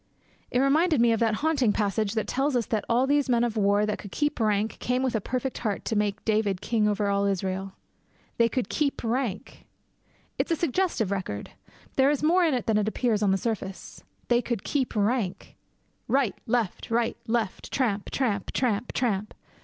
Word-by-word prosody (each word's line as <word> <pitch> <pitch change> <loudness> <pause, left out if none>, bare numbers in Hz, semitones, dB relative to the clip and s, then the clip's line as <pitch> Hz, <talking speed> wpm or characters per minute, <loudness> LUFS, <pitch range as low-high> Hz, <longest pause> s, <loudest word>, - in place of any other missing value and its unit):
It - - 0
reminded 305 +3 +3
me 235 0 +5
of 225 - +1
that 225 -2 +2
haunting 275 -9 +3
passage 210 0 0
that 220 - 0
tells 270 +1 0
us 240 -2 +1
that 220 -2 -1
'all 240 +3 +3
these 285 0 +2
men 240 -1 +3
of 235 -2 -1
war 205 0 +3
that 210 - -2
could 200 - -9
keep 295 -2 -1
rank 215 -1 0
came 250 +1 0
with 260 - 0
a 220 - 0
perfect 255 +4 -3
heart 210 -4 -2
to 225 - -1
make 210 0 -1
David 210 -4 +1
king 215 +1 +1
over 205 0 0
all 200 0 +1
Israel.' 190 0 -2 0.6
They 230 0 +4
could 250 -5 -1
keep 290 -3 -1
rank! 230 -3 -3 0.7
It - - +1
is 330 - +1
a - - -18
suggestive 330 - 0
record. 180 - -4 0.5
There 265 +1 +5
is 295 0 0
more 350 +4 +4
in 315 -5 +3
it 245 - -2
than 215 -2 +2
appears 215 +1 0
on 205 - +3
the 190 - +3
surface. 195 -3 -5 0.2
They 240 0 +3
could 235 -5 -3
keep 265 -4 -1
rank! 210 -2 -1 0.5
Right! 265 -6 +2
Left! 230 -5 -1
Right! 230 0 +1
Left! 225 -4 -2
Tramp! 215 -7 0
tramp! 215 -7 -1
tramp! 235 -2 0
tramp! 215 -4 -1
225 Hz, 190 wpm, -26 LUFS, 205-255 Hz, 0.7 s, me